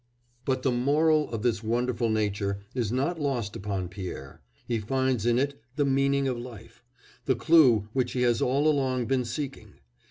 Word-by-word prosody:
But 130 -1 -1
the 130 - +2
moral 150 +5 +2
of 115 -2 -4
this 115 -4 +1
wonderful 120 +1 0
nature 100 -2 -1
is 120 -5 -1
not 145 +7 -1
lost 120 -8 -2
upon 95 -2 -3
Pierre; 95 0 -8 0.3
he 115 -2 0
finds 130 0 0
in 120 0 +3
it 140 0 -1
"the 145 -1 +1
meaning 140 0 +2
of 125 -2 -2
life," 120 -4 -11 0.4
the - - +2
clue 130 -11 +5
which 125 -2 0
he 125 - 0
has 120 -2 +2
all 140 +4 +2
along 130 -4 +1
been 130 0 0
seeking. 120 -4 -6
125 Hz, 170 wpm, -27 LUFS, 110-135 Hz, 0.4 s, clue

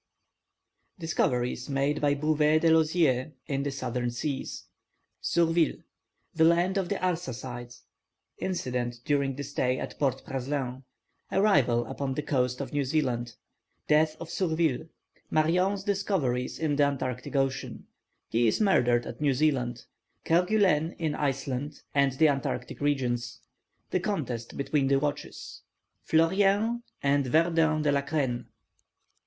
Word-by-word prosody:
Discoveries 125 -7 -1
made 140 +2 0
by 145 -1 +3
Bouvet 155 +1 +2
de 165 - +4
Lozier 155 -4 +2
in 140 -2 -1
the 145 - -1
Southern 125 -3 -2
Seas 135 +3 -4 0.6
Surville 165 -2 +2 0.6
The 160 - +3
land 175 +4 +3
of 185 - -2
the 200 - 0
Arsacides 130 -10 -4 0.6
Incident 125 -9 -2
during 140 -2 +1
the 145 - -5
stay 130 -2 -1
at - - -6
Port 135 -2 0
Praslin 130 -1 -3 0.5
Arrival 140 - +3
upon 135 -2 -3
the 150 - -2
coast 125 -3 0
of - - -6
New 145 -1 +1
Zealand 125 -5 -1 0.5
Death 155 +1 +3
of 165 0 -7
Surville 160 -4 0 0.4
Marion's 180 +5 +2
discoveries 190 - -1
in 150 -3 0
the 145 - +5
Antarctic 130 -2 -2
Ocean 135 -1 -1 0.4
He 115 +1 +2
is 110 - +1
murdered 125 - +3
at 120 - -8
New 140 -3 +2
Zealand 125 -5 0 0.4
Kerguelen 180 -2 +2
in 160 -3 -1
Iceland 140 0 -3
and 140 -2 +3
the 155 +4 +4
Antarctic 135 -3 -2
regions 130 -5 -1 0.5
The - - +2
contest 120 -1 -3
between 140 0 +1
the 135 0 +4
watches 145 +1 -4 0.5
Fleurien 200 +8 +3 0.2
and 140 -1 +2
Verdun 160 +1 +3
de 145 - +3
la 140 0 +2
Crenne. 130 -5 -2
145 Hz, 130 wpm, -28 LUFS, 125-160 Hz, 0.6 s, the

